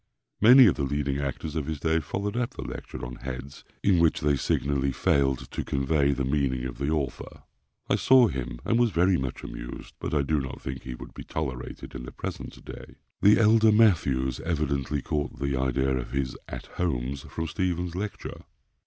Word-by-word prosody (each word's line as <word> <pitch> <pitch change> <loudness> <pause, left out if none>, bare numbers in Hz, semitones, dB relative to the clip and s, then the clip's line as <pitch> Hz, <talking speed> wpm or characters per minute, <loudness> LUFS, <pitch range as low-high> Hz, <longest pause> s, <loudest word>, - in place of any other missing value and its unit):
Many 125 +4 +9
of 95 - +5
the 70 - -1
leading 70 0 -1
actors 70 +2 -4
of 75 -3 -2
his 80 -3 -3
day 80 +2 +2
followed 100 +7 -3
up 125 +2 -2
the - - -5
lecture - - -7
on - - -7
"Heads," 65 +2 -7 0.2
in 95 -4 +4
which 85 -1 +3
they 75 -1 +3
signally 70 +1 0
failed 65 +1 +1
to - - -3
convey 70 +1 +1
the 70 -1 -1
meaning 65 -2 0
of 65 - -6
the 70 +1 -1
author. 75 -4 -3 0.4
I - - +2
saw 130 -2 +6
him, 60 - -4
and 115 - +2
was 120 -1 +4
very 90 +1 +3
much 65 -4 -3
amused; - - -8
but - - -3
I 70 - +3
do 75 +2 +1
not 65 -1 -6
think 65 0 -6
he 65 -1 -6
would - - -11
be - - -8
tolerated 65 -5 -5
in 65 - -6
the 60 +1 -8
present - - -7
day. - - -10 0.3
The 105 +1 +6
elder 110 0 +6
Mathews 75 - +3
evidently 75 -4 -1
caught 75 -1 -2
the 70 0 -1
idea 65 0 +1
of 60 -2 -4
his 70 -2 -1
"At - - -7
Homes" 70 -5 -1
from 80 - -3
Stephens's 90 +1 -2
lecture. 100 +2 -5
70 Hz, 195 wpm, -27 LUFS, 65-85 Hz, 0.4 s, Many